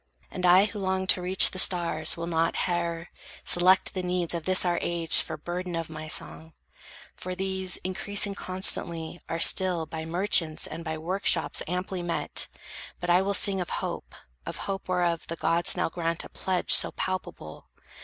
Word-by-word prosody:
And 180 -1 -1
I 185 +3 +6
who 210 0 -6
long 190 -1 -1
to 185 - +2
reach 185 +2 +6
The 185 - -4
stars 170 -4 +1
will 170 - -4
not, 165 -1 0
howe'er, 170 -1 -3 0.4
select 185 +2 +3
the 185 - -3
needs 180 -1 -1
Of 170 -2 -4
this 185 0 +2
our 175 -1 +1
age 170 -2 +1
for - - -5
burden 180 0 -5
of 165 -1 -4
my 155 0 -7
song; 160 +1 -2 0.6
For 185 0 -6
these, 190 -1 0
increasing 200 +2 0
constantly, 175 -3 -1
are 165 - -2
still 180 -1 +4
By 160 0 -7
merchants 165 -2 +1
and 165 - -7
by 160 -1 -4
work 180 +5 -3
shops - - +3
amply 180 +1 -3
met; 175 -1 -1 0.5
But 175 0 -1
I 180 +2 +5
will 200 +1 0
sing 195 -2 +3
of 175 - -5
hope, - - -5 0.3
of - - -6
hope 195 -1 -4
whereof 175 -2 0
The 165 - -4
gods 170 +2 +2
now 180 - +1
grant 165 0 -3
a - - -11
pledge 185 -2 -1
so - - +5
palpable. 185 - -6
175 Hz, 180 wpm, -27 LUFS, 165-185 Hz, 0.6 s, I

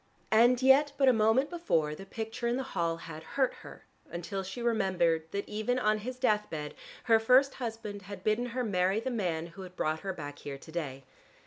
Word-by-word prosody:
And 240 +3 +5
yet 275 +2 +6
but 270 -1 +4
a 255 - +7
moment 225 +6 +3
before 165 - 0
the 195 +5 -9
picture 225 +3 -4
in 240 - +1
the 265 - -2
hall 165 -1 0
had 160 -1 -8 0.2
"hurt" 265 -2 +3
her, - - -12 0.2
until 185 +3 -4
she 190 +5 -7
remembered 185 -8 +1
that 200 +3 -4
even 215 +4 -1
on 215 -3 +2
his 250 +4 -5
death 210 -5 +1
bed 150 -2 -5 0.3
her 225 -2 +5
first 255 +4 +5
husband 225 -3 -5
had 195 0 -9
bidden 215 +3 +1
her 250 +1 -2
marry 190 -1 +1
the 260 +3 -3
man 175 -8 -1
who 195 - -9
had 185 -1 -10
brought 155 -2 -1
her 195 - -3
back 145 -5 -7
here 140 -1 -6
to 160 - -13
day. 140 -5 -4
210 Hz, 210 wpm, -30 LUFS, 170-245 Hz, 0.3 s, a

